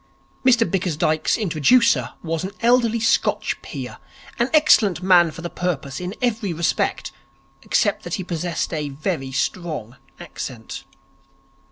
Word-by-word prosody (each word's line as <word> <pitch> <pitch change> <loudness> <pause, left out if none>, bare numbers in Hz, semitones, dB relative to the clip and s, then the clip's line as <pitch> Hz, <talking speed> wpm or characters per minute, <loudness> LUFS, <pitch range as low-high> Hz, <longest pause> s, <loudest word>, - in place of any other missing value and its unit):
Mr 245 -3 +4
Bickersdyke's 155 -4 0
introducer 215 - +3
was 165 -1 -2
an 190 - -3
elderly 235 -1 +3
Scotch 225 - +1
peer, - - -7 0.4
an 235 +2 +2
excellent 215 - +4
man 180 -3 +5
for 165 +2 -10
the - - -2
purpose 140 -7 -3
in 180 +3 -5
every 220 -6 0
respect, 165 +1 -1 0.5
except - - +1
that - - -4
he 190 - -4
possessed 170 -1 -3
a 150 -2 -2
very 140 -1 -3
strong 135 -4 -3 0.2
accent. 130 -9 -7
175 Hz, 130 wpm, -22 LUFS, 155-220 Hz, 0.5 s, man